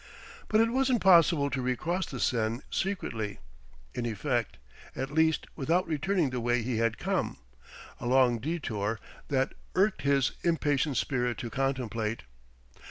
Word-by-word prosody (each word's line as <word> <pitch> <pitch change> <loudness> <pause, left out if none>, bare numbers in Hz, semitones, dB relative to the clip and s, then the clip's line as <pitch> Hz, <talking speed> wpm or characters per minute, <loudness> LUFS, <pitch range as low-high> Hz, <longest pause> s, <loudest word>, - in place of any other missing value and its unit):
But 215 - +3
it 230 0 +2
wasn't 260 -1 +2
possible 165 -6 +5
to 135 0 -1
recross 155 +9 -1
the - - -6
Seine 115 0 0
secretly 115 - -2 0.6
in 120 - -2
effect, 120 +2 -1 0.4
at 135 +1 -3
least 160 0 +2
without 165 +6 +1
returning 160 0 0
the 125 - -2
way 120 0 +1
he 120 0 -1
had 115 0 +1
come - - -1 0.6
a - - -4
long 125 -2 +4
detour 115 -7 -2 0.3
that 135 -1 0 0.2
irked 195 -5 +2
his 140 -2 +2
impatient 145 -5 +1
spirit 125 -3 0
to 120 - -5
contemplate. 115 - -2
135 Hz, 140 wpm, -29 LUFS, 120-165 Hz, 0.6 s, possible